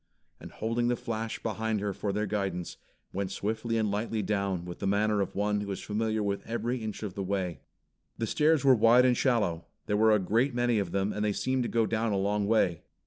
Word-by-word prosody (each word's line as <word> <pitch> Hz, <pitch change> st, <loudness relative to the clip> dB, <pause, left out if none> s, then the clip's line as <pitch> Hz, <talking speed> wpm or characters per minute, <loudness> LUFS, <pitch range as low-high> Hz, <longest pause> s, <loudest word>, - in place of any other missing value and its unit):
and -, -, -10 dB
holding 115 Hz, +2 st, -1 dB
the 120 Hz, -, +2 dB
flash 115 Hz, -2 st, -4 dB
behind 110 Hz, -1 st, -1 dB
her 100 Hz, 0 st, -2 dB
for 100 Hz, -, -2 dB
their 105 Hz, +2 st, -1 dB
guidance, 95 Hz, -4 st, -3 dB, 0.4 s
went 100 Hz, 0 st, -2 dB
swiftly 110 Hz, +4 st, -2 dB
and 110 Hz, -2 st, +1 dB
lightly 110 Hz, +1 st, -1 dB
down, 100 Hz, -3 st, -1 dB
with 90 Hz, -1 st, -7 dB
the 100 Hz, -, -2 dB
manner 105 Hz, +1 st, +2 dB
of 95 Hz, -, -3 dB
one 105 Hz, 0 st, 0 dB
who 100 Hz, -, -5 dB
is 95 Hz, -, -3 dB
familiar 110 Hz, 0 st, -1 dB
with 100 Hz, -1 st, -1 dB
every 120 Hz, +2 st, -2 dB
inch 110 Hz, -1 st, -5 dB
of 100 Hz, -3 st, -4 dB
the 100 Hz, -, -4 dB
way. 90 Hz, -6 st, -2 dB, 0.6 s
The 115 Hz, -, -1 dB
stairs 150 Hz, +4 st, +2 dB
were 135 Hz, -, +8 dB
wide 120 Hz, +2 st, +6 dB
and 125 Hz, -1 st, +4 dB
shallow. 100 Hz, -11 st, +1 dB, 0.2 s
There 105 Hz, -, 0 dB
were 110 Hz, +1 st, +5 dB
a 105 Hz, -, +6 dB
great 115 Hz, +7 st, +1 dB
many 120 Hz, -2 st, +2 dB
of 95 Hz, -4 st, -2 dB
them 100 Hz, +1 st, 0 dB
and 105 Hz, -, -2 dB
they 105 Hz, -1 st, +1 dB
seemed 130 Hz, +5 st, 0 dB
to 120 Hz, -, -1 dB
go 115 Hz, -1 st, +2 dB
down 115 Hz, 0 st, 0 dB
a -, -, +1 dB
long 100 Hz, +1 st, 0 dB
way. 95 Hz, -6 st, +2 dB
105 Hz, 230 wpm, -29 LUFS, 100-115 Hz, 0.6 s, were